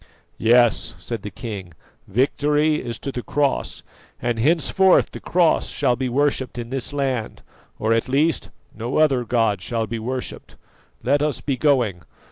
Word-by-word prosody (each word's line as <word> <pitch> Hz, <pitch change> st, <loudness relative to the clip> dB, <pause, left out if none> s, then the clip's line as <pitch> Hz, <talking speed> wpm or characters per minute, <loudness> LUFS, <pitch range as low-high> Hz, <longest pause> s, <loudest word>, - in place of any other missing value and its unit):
"Yes," 120 Hz, 0 st, +3 dB
said 115 Hz, -3 st, -5 dB
the 105 Hz, -, -6 dB
king, 100 Hz, -6 st, -7 dB, 0.3 s
"victory 145 Hz, +7 st, +1 dB
is 120 Hz, -2 st, -4 dB
to 140 Hz, -, -5 dB
the 125 Hz, -, -4 dB
Cross, 140 Hz, -, -1 dB, 0.4 s
and 120 Hz, -1 st, -1 dB
henceforth 170 Hz, +7 st, +3 dB
the -, -, -8 dB
Cross 175 Hz, -2 st, +2 dB
shall 135 Hz, -4 st, +1 dB
be 130 Hz, 0 st, -2 dB
worshipped 130 Hz, -1 st, 0 dB
in 120 Hz, 0 st, -6 dB
this 135 Hz, 0 st, -3 dB
land, 135 Hz, -5 st, -2 dB, 0.3 s
or 110 Hz, +1 st, +1 dB
at 115 Hz, +3 st, 0 dB
least 150 Hz, +5 st, +1 dB, 0.3 s
no 120 Hz, +3 st, -3 dB
other 140 Hz, -5 st, +3 dB
god 115 Hz, -5 st, +1 dB
shall 115 Hz, +2 st, -1 dB
be 115 Hz, 0 st, -4 dB
worshipped. 125 Hz, +3 st, -5 dB, 0.5 s
Let 140 Hz, +3 st, +2 dB
us 150 Hz, -3 st, 0 dB
be 140 Hz, -, -1 dB
going. 125 Hz, -, +1 dB
125 Hz, 155 wpm, -22 LUFS, 115-145 Hz, 0.5 s, Yes